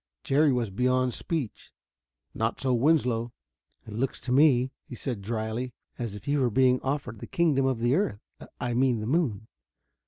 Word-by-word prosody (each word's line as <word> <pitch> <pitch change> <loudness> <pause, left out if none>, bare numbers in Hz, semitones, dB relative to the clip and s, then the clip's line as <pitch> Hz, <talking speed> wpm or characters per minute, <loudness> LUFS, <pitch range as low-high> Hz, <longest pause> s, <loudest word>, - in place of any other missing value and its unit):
Jerry 145 +2 +3
was 120 -5 0
beyond 125 +3 +1
speech. 150 -6 -4 0.6
Not 115 +1 -1
so 130 -1 +1
Winslow. 120 -3 +2 0.5
"It 110 - -9
looks 125 +5 -2
to 125 +1 -4
me," 130 -2 +4
he 125 - -9
said 120 -3 -4
dryly, 110 +3 -3 0.3
"as 115 -4 -3
if 105 - -11
you 145 0 +2
were 125 - +3
being 130 +2 +3
offered 135 -5 -3
the - - -8
kingdom 155 -8 +2
of 130 -2 +1
the 120 +2 +1
earth 145 - 0 0.4
I 120 -1 -2
mean 125 -1 +2
the 105 - -4
moon. 120 - 0
125 Hz, 175 wpm, -27 LUFS, 115-135 Hz, 0.6 s, me